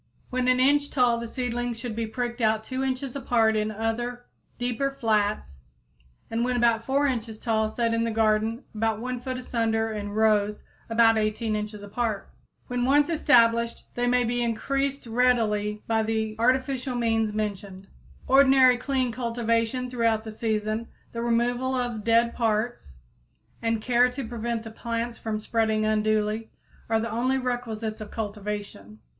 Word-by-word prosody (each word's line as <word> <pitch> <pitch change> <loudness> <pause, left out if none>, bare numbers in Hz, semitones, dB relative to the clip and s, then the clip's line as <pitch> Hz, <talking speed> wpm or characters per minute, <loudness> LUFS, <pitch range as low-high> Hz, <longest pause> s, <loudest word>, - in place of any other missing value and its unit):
When 255 0 0
an 255 0 +4
inch 285 +2 +3
tall 245 -3 +2
the 235 - -5
seedlings 245 -1 -3
should 235 -3 -5
be 230 0 -2
pricked 240 +1 -4
out 220 -1 +2
2 260 +3 -3
inches 265 0 -2
apart 230 -4 +2
in 215 0 0
other, 235 +3 -3 0.3
deeper 245 +3 -1
flats 215 - -1 0.7
and 230 +1 0
when 250 0 0
about 230 -1 +3
4 275 +3 +1
inches 230 -5 -2
tall 220 -1 0
set 230 +1 0
in 230 0 +1
the 230 - 0
garden 220 +2 +1
about 220 0 0
1 250 +1 -3
foot 255 0 -4
asunder 225 -3 -1
in 205 -1 -4
rows 210 -1 +2 0.3
about 225 -1 +4
18 215 +1 -1
inches 210 -1 -5
apart. 215 0 -3 0.3
When 245 0 -2
once 285 +4 +4
established 235 -7 +3
they 245 0 0
may 250 0 +3
be 240 +1 -1
increased 275 +4 -1
readily 225 -3 +1
by 225 -1 +1
the 220 0 -1
artificial 260 +1 +1
means 225 -2 +1
mentioned. 200 -3 -4
(See - - -22
page - - -24
34.) 265 - +3
Ordinary 265 -2 +6
clean 260 -1 -1
cultivation 230 +1 -1
throughout 230 -3 +1
the 220 - -7
season, 215 0 -2 0.2
the 230 - -4
removal 240 +2 +1
of 240 -4 -2
dead 230 +1 +3
parts, 220 - -1 0.6
and 230 -1 0
care 245 0 +4
to 250 -1 -6
prevent 235 0 -3
the 225 - -8
plants 235 +1 -4
from 215 -1 -3
spreading 220 0 0
unduly, 215 0 0 0.4
are 225 0 +3
the 230 +1 -3
only 255 +4 +1
requisites 230 -4 -3
of 215 - -7
cultivation. 205 - -5
230 Hz, 160 wpm, -26 LUFS, 220-245 Hz, 0.7 s, Ordinary